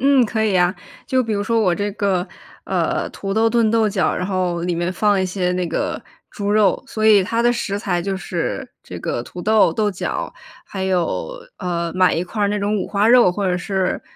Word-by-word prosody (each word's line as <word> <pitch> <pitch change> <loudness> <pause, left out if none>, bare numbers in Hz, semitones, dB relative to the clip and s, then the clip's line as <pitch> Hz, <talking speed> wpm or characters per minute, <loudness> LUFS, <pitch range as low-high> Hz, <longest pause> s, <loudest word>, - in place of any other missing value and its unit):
嗯， 270 -1 +4
可 220 0 -1
以 210 - +1
呀。 180 0 +3 0.3
就 260 -1 +2
比 225 -2 -3
如 200 0 0
说 230 +2 +1
我 180 -5 +2
这 205 +2 -2
个， 195 -4 0 0.4
呃， - - -1
土 195 0 -5
豆 225 +2 +3
炖 225 -1 +2
豆 225 -1 +3
角， 195 -2 0
然 180 - -2
后 185 -3 -1
里 175 -1 -1
面 175 +2 -1
放 205 0 +2
一 - - +1
些 180 -1 -1
那 180 -1 -1
个 - - -3 0.3
猪 205 -1 -3
肉， 210 -2 +3
所 220 0 -1
以 205 -3 +6
它 230 +5 -1
的 240 +1 +3
食 200 -4 -2
材 180 -4 -1
就 195 +1 -2
是 185 - -4
这 - - -8
个 120 - -3
土 175 - -9
豆、 215 -3 +3
豆 210 +1 0
角， 185 - -4 0.3
还 190 -1 -4
有， 185 - -1 0.3
呃， 170 -2 -2
买 185 0 +4
一 170 - -1
块 210 +3 -4
儿 200 - +3
那 210 0 -1
种 205 +1 0
五 195 - -2
花 205 +1 +1
肉， 240 -6 +6
或 195 +1 -2
者 180 -1 +1
是， 190 0 -2
200 Hz, 240 characters per minute, -20 LUFS, 180-215 Hz, 0.4 s, 以